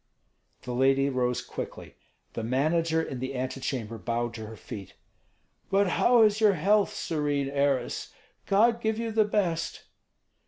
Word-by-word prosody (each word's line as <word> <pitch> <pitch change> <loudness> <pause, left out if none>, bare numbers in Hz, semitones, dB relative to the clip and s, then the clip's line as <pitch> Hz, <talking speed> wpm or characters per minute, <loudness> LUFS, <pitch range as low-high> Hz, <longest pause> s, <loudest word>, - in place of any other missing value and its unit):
The 125 - -5
lady 135 +2 +3
rose 125 -1 0
quickly. - - -7 0.4
The - - -3
manager 160 +7 +1
in 130 - -5
the 130 +1 -4
antechamber 125 -3 -3
bowed 120 +3 -2
to 110 -2 -7
her 110 - -9
feet. 100 -3 -9 0.7
"But 195 0 +3
how 240 +5 +4
is 215 0 +3
your 210 -2 +6
health, 200 +5 +2
serene 145 -3 -1
heiress? 140 -3 0 0.4
God 230 +4 +3
give 220 -1 0
you 230 0 -2
the 215 -1 +3
best." 185 -6 -1
145 Hz, 145 wpm, -28 LUFS, 125-200 Hz, 0.7 s, your